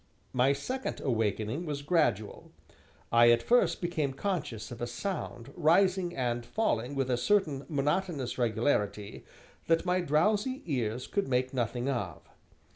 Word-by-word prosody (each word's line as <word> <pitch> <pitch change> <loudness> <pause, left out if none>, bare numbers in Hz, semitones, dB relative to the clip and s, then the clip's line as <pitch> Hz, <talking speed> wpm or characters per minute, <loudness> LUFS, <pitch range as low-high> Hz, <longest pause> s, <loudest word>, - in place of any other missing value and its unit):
My 130 +2 +4
second 255 - -3
awakening 115 - -1
was 145 -1 -3
gradual. 150 - 0 0.6
I 120 0 +7
at 120 0 +4
first 245 +1 +3
became 155 -6 -1
conscious 135 - -3
of 120 - -8
a 120 - -1
sound, 135 - -5
rising 180 +2 +3
and 120 -2 -1
falling 130 - -1
with 135 -2 0
a 125 - +2
certain 150 -1 +1
monotonous 150 -2 -1
regularity, 110 -3 0 0.4
that 165 +1 +2
my 180 0 +2
drowsy 210 - +1
ears 125 -6 -2
could 200 - -1
make 130 0 0
nothing 120 0 -1
of. 105 - -3
135 Hz, 135 wpm, -30 LUFS, 120-175 Hz, 0.6 s, I